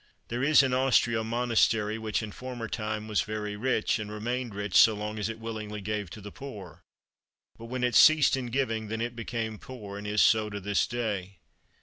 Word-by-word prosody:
There 120 Hz, +1 st, -2 dB
is 140 Hz, 0 st, +6 dB
in 130 Hz, -1 st, 0 dB
Austria 125 Hz, -3 st, +3 dB
a -, -, -2 dB
monastery 115 Hz, -2 st, +1 dB
which 110 Hz, 0 st, -2 dB
in 105 Hz, -, -6 dB
former 125 Hz, 0 st, -6 dB
time 110 Hz, -1 st, -4 dB
was 105 Hz, -1 st, +1 dB
very 105 Hz, -1 st, -4 dB
rich, 115 Hz, 0 st, 0 dB
and 105 Hz, -1 st, -5 dB
remained 120 Hz, +1 st, -3 dB
rich 100 Hz, -2 st, -4 dB
so 110 Hz, -, +7 dB
long 105 Hz, +1 st, -4 dB
as 105 Hz, +1 st, -1 dB
it 115 Hz, -, -5 dB
willingly 110 Hz, -2 st, -6 dB
gave 105 Hz, -1 st, -3 dB
to 105 Hz, -, -10 dB
the 105 Hz, +1 st, -9 dB
poor; 105 Hz, -, -10 dB, 0.7 s
but 115 Hz, -, -11 dB
when 125 Hz, +2 st, -4 dB
it 125 Hz, -1 st, +1 dB
ceased 155 Hz, -2 st, +6 dB
in 130 Hz, -2 st, -4 dB
giving, 115 Hz, -3 st, -1 dB
then 110 Hz, +1 st, -4 dB
it 120 Hz, +1 st, -3 dB
became 115 Hz, -2 st, -4 dB
poor, 105 Hz, -7 st, -8 dB
and 105 Hz, -, -7 dB
is 105 Hz, +1 st, +3 dB
so 110 Hz, -1 st, +3 dB
to 100 Hz, -1 st, -5 dB
this 100 Hz, +1 st, 0 dB
day. 100 Hz, -6 st, -3 dB
110 Hz, 210 wpm, -28 LUFS, 105-120 Hz, 0.7 s, so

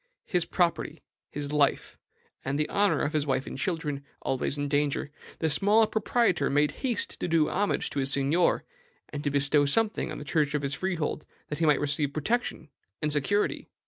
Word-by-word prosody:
His 180 Hz, -3 st, 0 dB
property, 170 Hz, -3 st, -1 dB, 0.3 s
his 145 Hz, 0 st, -5 dB
life, 150 Hz, -2 st, +1 dB, 0.5 s
and 135 Hz, +1 st, -1 dB
the 150 Hz, -, 0 dB
honor 205 Hz, 0 st, +2 dB
of 150 Hz, -, -1 dB
his 150 Hz, -1 st, 0 dB
wife 135 Hz, 0 st, 0 dB
and -, -, -7 dB
children 150 Hz, -2 st, -2 dB, 0.2 s
always 135 Hz, +2 st, -1 dB
in 145 Hz, 0 st, -1 dB
danger 145 Hz, 0 st, 0 dB, 0.3 s
the 160 Hz, -, 0 dB
small 205 Hz, +8 st, +4 dB
proprietor 215 Hz, -, +1 dB
made 145 Hz, +1 st, +2 dB
haste 250 Hz, -4 st, -2 dB
to -, -, -2 dB
do 165 Hz, -3 st, +2 dB
homage 205 Hz, +2 st, 0 dB
to 145 Hz, -, -2 dB
his 135 Hz, 0 st, -1 dB
seignior, 145 Hz, +5 st, +2 dB, 0.5 s
and 145 Hz, -1 st, -5 dB
to 145 Hz, -, +1 dB
bestow 145 Hz, +1 st, +3 dB
something 220 Hz, +8 st, +1 dB
on -, -, -5 dB
the 145 Hz, -, -8 dB
church 150 Hz, 0 st, +1 dB
of 145 Hz, -, -1 dB
his 140 Hz, 0 st, -1 dB
freehold, 165 Hz, -2 st, -2 dB, 0.3 s
that 150 Hz, -, -4 dB
he 165 Hz, -, +2 dB
might 150 Hz, -2 st, +4 dB
receive 145 Hz, 0 st, -1 dB
protection 180 Hz, -, -2 dB, 0.3 s
and 150 Hz, -, -1 dB
security. 200 Hz, +9 st, 0 dB
150 Hz, 185 wpm, -28 LUFS, 145-175 Hz, 0.5 s, small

